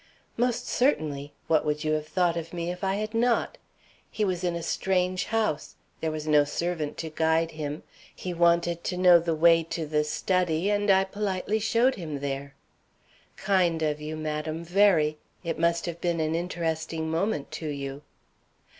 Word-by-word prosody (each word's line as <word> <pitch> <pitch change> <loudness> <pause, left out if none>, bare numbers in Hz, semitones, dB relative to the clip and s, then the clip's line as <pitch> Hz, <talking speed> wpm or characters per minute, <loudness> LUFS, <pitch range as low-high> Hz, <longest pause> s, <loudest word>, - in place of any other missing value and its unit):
"Most 240 0 0
certainly! 150 - 0
What 160 -2 +3
would 150 0 -1
you 155 - 0
have 155 0 -1
thought 175 -1 +1
of 165 0 -5
me 170 0 -2
if 180 +1 -8
I 190 0 +1
had 215 +2 -3
not? 235 +1 +1 0.5
He 215 - -1
was 185 -2 -2
in 175 -1 0
a 170 - -4
strange 185 +1 0
house; 215 -10 -1 0.2
there 160 - -1
was 155 -1 -4
no 150 -1 +5
servant 155 +1 -3
to 160 -1 -5
guide 160 +1 +1
him, 150 -1 -5 0.3
he 180 - -5
wanted 170 0 +2
to 180 - -2
know 180 -1 +7
the 165 -1 -1
way 165 +1 +5
to 165 0 -4
the 150 0 +1
study, 175 +3 0
and 205 0 +1
I 190 0 +6
politely 200 +1 -2
showed 235 +4 +3
him 155 -6 -5
there." 140 0 -4 0.8
"Kind 180 -4 +1
of 150 -1 -1
you, 155 +1 -4
madam, 155 +1 -3
very. 170 -4 +3 0.2
It 165 -2 -3
must 170 0 +2
have 170 -1 -5
been 170 -1 0
an 155 0 0
interesting 165 -2 -2
moment 165 -3 -1
to 160 - -5
you." 140 -1 -5
170 Hz, 175 wpm, -27 LUFS, 155-185 Hz, 0.8 s, know